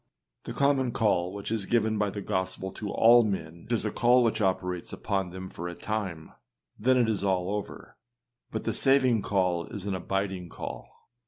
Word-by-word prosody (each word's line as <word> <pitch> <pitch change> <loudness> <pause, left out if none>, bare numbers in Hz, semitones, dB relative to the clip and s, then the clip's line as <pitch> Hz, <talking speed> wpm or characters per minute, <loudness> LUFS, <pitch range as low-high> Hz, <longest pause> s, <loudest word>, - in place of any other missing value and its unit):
â - - -54
The - - -5
common 135 -3 +2
call 90 -5 +1
which 100 +2 -6
is 110 -4 -1
given 110 -2 +1
by 105 -1 +1
the 100 0 -6
gospel 95 -1 -1
to 105 +2 -6
all 120 +3 +6
men 85 -3 -4
is 120 -2 +1
a 105 - -1
call 125 0 +4
which 115 -1 +1
operates 90 -2 -1
upon 95 -3 -2
them 95 +1 -7
for 85 -1 -6
a 85 - -6
time, 95 -7 -4 0.5
and 105 - -13
then 130 0 +6
it 120 -2 +3
is 105 -3 -1
all 95 -1 0
over; 105 -1 -6 0.5
but - - -4
the - - -1
saving 130 -5 +3
call 90 -5 0
is 100 -4 -7
an 100 - -1
abiding 95 -1 -2
call. - - -7
100 Hz, 195 wpm, -28 LUFS, 95-115 Hz, 0.5 s, all